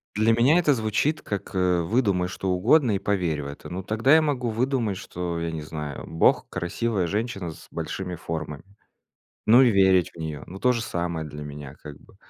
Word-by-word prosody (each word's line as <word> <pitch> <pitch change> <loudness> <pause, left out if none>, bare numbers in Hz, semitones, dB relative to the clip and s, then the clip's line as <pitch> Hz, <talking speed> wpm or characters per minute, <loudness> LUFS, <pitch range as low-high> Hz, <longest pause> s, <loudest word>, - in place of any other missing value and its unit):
Для 110 +1 +3
меня 125 +9 +4
это 155 -5 +4
звучит 110 +6 0
как, 100 -2 -5
э: 90 -2 +2
"Выдумай 95 -2 +1
что 95 +1 -4
угодно 110 - +3
и - - -1
поверь 90 -7 -1
в - - -7
это". 70 - -9
Ну, 90 +2 -5
тогда 115 - +3
я 160 - +6
могу 130 -6 -1
выдумать, 115 -3 0
что 90 -3 -4
я 85 0 -2
не 80 - -5
знаю, 75 -2 -6
Бог- 80 - +2
красивая 90 +3 -1
женщина 100 -4 -3
с - - -14
большими 90 -2 -4
формами. 75 -3 -5 0.8
Ну, 120 +4 +7
и 125 - +5
верить 95 -3 +4
в - - -15
неё. 80 -2 -5
Ну, 95 - -9
то 125 - +4
же 115 -2 -2
самое 85 -4 -3
для 75 0 -8
меня 75 -1 -8
как 75 -2 -9
бы. - - -21
95 Hz, 200 wpm, -25 LUFS, 80-115 Hz, 0.8 s, Ну